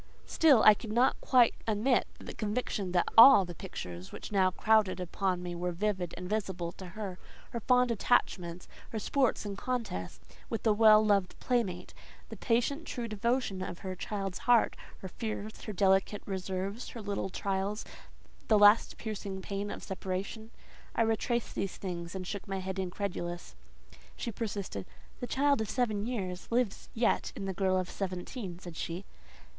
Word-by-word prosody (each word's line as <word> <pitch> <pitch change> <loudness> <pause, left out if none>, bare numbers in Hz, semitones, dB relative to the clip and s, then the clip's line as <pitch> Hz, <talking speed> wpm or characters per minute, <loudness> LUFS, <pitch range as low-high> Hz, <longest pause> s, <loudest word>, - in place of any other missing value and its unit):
Still 290 -8 +5
I 215 - +10
could 210 +1 -7
not 240 +4 +3
quite 245 -3 +5
admit 225 +4 +2
the - - -8
conviction 210 -3 -2
that 175 -1 +2
all 225 -4 +10
the 175 - -7
pictures 90 - -7
which - - -8
now 190 -2 +4
crowded 210 0 +2
upon 180 0 -1
me 175 -1 -4
were 175 +1 -2
vivid 185 -1 -2
and 180 - -6
visible 190 -5 -2
to 185 +1 -10
her. 195 -4 -5 0.3
Her 235 - -3
fond 250 +1 +3
attachments, 180 -6 0 0.2
her 225 - -5
sports 255 +1 +1
and 200 -1 -4
contests 225 - -4 0.3
with 225 - -3
a 220 - +5
well 215 0 +7
loved 200 -3 +1
playmate, 195 -8 -1 0.4
the 225 - -7
patient, 245 - 0
true 240 -3 -4
devotion 215 -2 -1
of 180 -2 -5
her 185 -1 -3
child's 195 -1 -4
heart, 240 -2 +5 0.3
her 190 - -5
fears, 215 +2 -5
her 215 - -4
delicate 195 +1 +2
reserves, 190 +3 -4
her 230 - -8
little 200 -1 -2
trials, 195 +2 -2 0.6
the 215 - +5
last 205 +2 +6
piercing 200 -3 -5
pain 200 +2 -4
of - - -7
separation…. 195 +3 -4 0.5
I 230 - +3
retraced 225 +1 0
these 195 - -3
things, 175 -2 -5
and 185 -1 -4
shook 200 +2 -5
my 195 0 -2
head 190 0 -4
incredulous. 175 - -4 0.6
She 235 - -4
persisted. 200 - -4 0.3
"The 245 - -4
child 280 -2 +2
of 215 - -3
seven 220 -4 0
years 190 -7 -4
lives 235 -3 0
yet 230 +1 +1
in 195 - -5
the 190 - -2
girl 185 0 +1
of 185 -1 -1
seventeen," 185 +1 -5
said 175 -2 -10
she. 170 +4 -4
200 Hz, 165 wpm, -31 LUFS, 185-225 Hz, 0.6 s, I